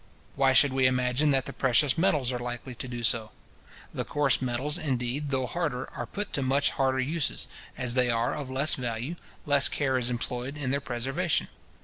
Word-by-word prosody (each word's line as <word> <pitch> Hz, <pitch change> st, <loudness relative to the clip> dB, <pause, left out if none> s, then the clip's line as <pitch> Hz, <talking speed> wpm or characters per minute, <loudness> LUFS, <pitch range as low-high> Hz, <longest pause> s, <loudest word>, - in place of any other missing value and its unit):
Why 135 Hz, -1 st, +3 dB
should 135 Hz, 0 st, +6 dB
we 130 Hz, -1 st, +4 dB
imagine 125 Hz, +3 st, +1 dB
that 135 Hz, -2 st, +2 dB
the -, -, -5 dB
precious 130 Hz, +1 st, +3 dB
metals 150 Hz, -8 st, +2 dB
are 125 Hz, -, -3 dB
likely 120 Hz, +1 st, -6 dB
to 120 Hz, +2 st, -6 dB
do 120 Hz, -1 st, -6 dB
so? 110 Hz, -1 st, +1 dB, 0.6 s
The -, -, -2 dB
coarse 145 Hz, -4 st, +2 dB
metals, 130 Hz, +6 st, -1 dB
indeed, 135 Hz, -1 st, -2 dB
though 130 Hz, -2 st, 0 dB
harder, 140 Hz, -4 st, -3 dB
are -, -, -5 dB
put 205 Hz, 0 st, -5 dB
to 140 Hz, -, 0 dB
much 135 Hz, +2 st, +2 dB
harder 130 Hz, -1 st, 0 dB
uses, 150 Hz, +4 st, -1 dB, 0.3 s
and, 130 Hz, -, -3 dB
as 120 Hz, -, +6 dB
they 125 Hz, -1 st, +2 dB
are 115 Hz, 0 st, +1 dB
of 140 Hz, -3 st, -5 dB
less 135 Hz, +4 st, +2 dB
value, 125 Hz, +5 st, -3 dB, 0.3 s
less 145 Hz, -1 st, +5 dB
care 135 Hz, -3 st, 0 dB
is 120 Hz, 0 st, -1 dB
employed 125 Hz, +3 st, -4 dB
in 135 Hz, -3 st, -2 dB
their 140 Hz, +1 st, 0 dB
preservation. 135 Hz, +8 st, -1 dB
130 Hz, 200 wpm, -28 LUFS, 125-145 Hz, 0.6 s, should